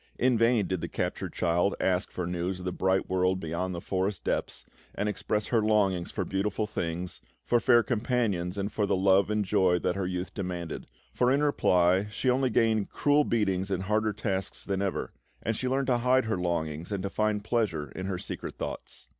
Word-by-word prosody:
In 125 0 +3
vain 115 -2 +3
did 95 -3 -2
the - - -2
captured - - -3
child 90 +3 +1
ask 90 -1 +1
for 90 - -4
news 90 +2 -2
of 90 - -8
the 90 - -1
bright 95 +1 +1
world 95 0 +1
beyond 90 +2 -3
the - - -3
forest 95 +2 -2
depths, - - -2 0.3
and 105 - -1
express 105 +1 -2
her 115 -2 +3
longings 100 -5 +2
for - - -3
beautiful 100 +2 -1
things, 90 -3 -4 0.2
for 120 - +3
fair 120 0 +5
companions, 110 -7 0
and 100 +1 -2
for 105 -1 0
the - - +2
love 95 +1 +4
and 105 -1 0
joy 90 -1 +3
that 90 +1 -1
her 95 -2 -1
youth 90 0 -4
demanded; 90 -4 -4 0.3
for, 125 - +2
in 140 +2 +2
reply, 95 -8 +3
she 125 +4 0
only 130 +1 +2
gained 110 -4 +2
cruel 145 +1 +3
beatings 95 -6 0
and 95 -1 -1
harder 110 +2 +1
tasks 95 -2 -3
than 95 -1 -1
ever, 100 -2 -2 0.3
and 115 - 0
she 130 - -2
learned 135 +1 +1
to 125 -2 +2
hide 125 +1 +3
her 110 -3 -1
longings 85 -1 -2
and 100 -2 -2
to 100 - -2
find 105 -1 0
pleasure 100 - -1
in 95 - -5
her 95 -2 -2
secret - - -6
thoughts. - - -6
100 Hz, 205 wpm, -28 LUFS, 90-110 Hz, 0.3 s, fair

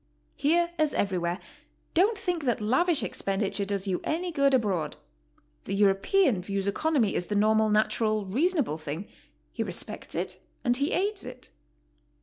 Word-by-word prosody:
Here, 340 +4 +2
as 310 -1 +2
everywhere, 180 -3 0 0.6
don't 405 +6 +3
think 350 -6 -2
that 240 -3 +1
lavish 260 +7 +2
expenditure 195 +1 -1
does 200 0 -2
you 185 -2 -1
any 350 +3 -2
good 280 -3 +3
abroad. 190 - -1 0.7
The - - -2
European 205 - +3
views 195 +1 -2
economy 235 +1 +1
as 175 - -1
the 210 - -2
normal, 215 +1 +3
natural, 215 0 +1
reasonable 265 - +1
thing; 155 +6 -5 0.4
he - - -4
respects - - -5
it - - -3 0.2
and 245 0 +3
he 280 +4 0
aids 400 +2 0
it. - - -8
215 Hz, 145 wpm, -28 LUFS, 195-315 Hz, 0.7 s, don't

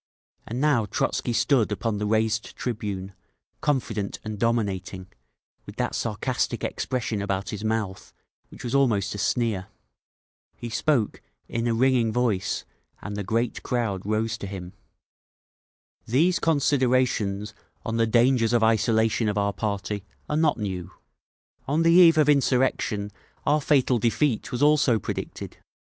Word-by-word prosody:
And 120 +3 -4
now 135 -7 +2
Trotzky 120 - -1
stood 120 -2 +2
upon 105 0 -2
the 105 - -1
raised 110 +1 0
tribune, 100 -5 -4 0.5
confident 115 -8 -1
and 110 -1 -5
dominating, 100 -5 -1 0.6
with - - -9
that - - -2
sarcastic - - -2
expression 120 -5 -2
about 100 -1 -2
his 105 0 -5
mouth 110 -3 -2 0.4
which - - -12
was 120 0 -4
almost 115 -8 +2
a 105 - -6
sneer. 110 -3 0 0.9
He 120 - -7
spoke, 125 -3 0 0.3
in 115 +1 -2
a 115 - +1
ringing 125 -2 +3
voice, 110 -5 0 0.4
and 105 0 -5
the 105 - -3
great 115 +5 -1
crowd 115 -7 -2
rose 110 +2 -1
to 100 - -5
him. 95 -2 -7 1.3
"These 165 +10 +3
considerations 130 -9 +1 0.3
on 115 0 -2
the 115 0 +2
dangers 120 0 +3
of 120 -2 +3
isolation 110 0 +2
of 105 - -2
our 100 0 +1
party 100 -1 -3 0.2
are 150 - -2
not 155 -1 +2
new. 95 -5 -4 0.8
On 150 +4 +1
the 165 - +5
eve 170 -2 +7
of 155 -2 +4
insurrection 130 -6 +1 0.3
our 150 +1 +3
fatal 135 -4 +2
defeat 115 +2 0
was 125 +3 -1
also 145 -5 +4
predicted. 105 - -6
115 Hz, 140 wpm, -25 LUFS, 105-130 Hz, 1.3 s, eve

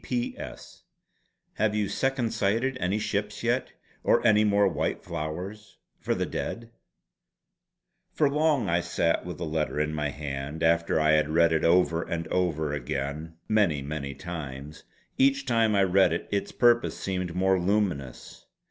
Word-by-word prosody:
"P.P.P.S. 120 -2 -5 0.8
Have 105 0 +1
you 105 -1 0
second 130 +2 -1
sighted 115 +7 0
any 95 +3 0
ships 105 0 -3
yet? 120 +2 0 0.3
Or - - +3
any 110 -2 +5
more 100 -1 +3
white 95 - -2
flowers 90 +6 -6 0.2
for - - -1
the - - -1
Dead?" 115 0 -5 1.4
For 150 - +2
long 150 -5 +1
I 85 0 +2
sat 85 -1 0
with 90 - -6
the 85 - -4
letter 75 -1 -2
in 75 0 0
my 75 -1 -1
hand 70 +2 -5
after 85 0 +2
I 75 0 +3
had 75 -1 +3
read 85 +1 +3
it 80 - +1
over 85 -1 +3
and 85 -1 -4
over 80 -5 0
again 70 +4 -4
many 95 -10 +2
many 70 -1 -5
times. 75 -3 -7 0.3
Each 140 +1 +3
time 115 -4 +2
I 100 - +4
read 95 -2 +4
it 85 - -3
its 100 -1 -1
purpose 120 -1 +3
seemed 90 -3 -3
more 95 0 +2
luminous. 90 - -2
90 Hz, 155 wpm, -27 LUFS, 80-105 Hz, 1.4 s, any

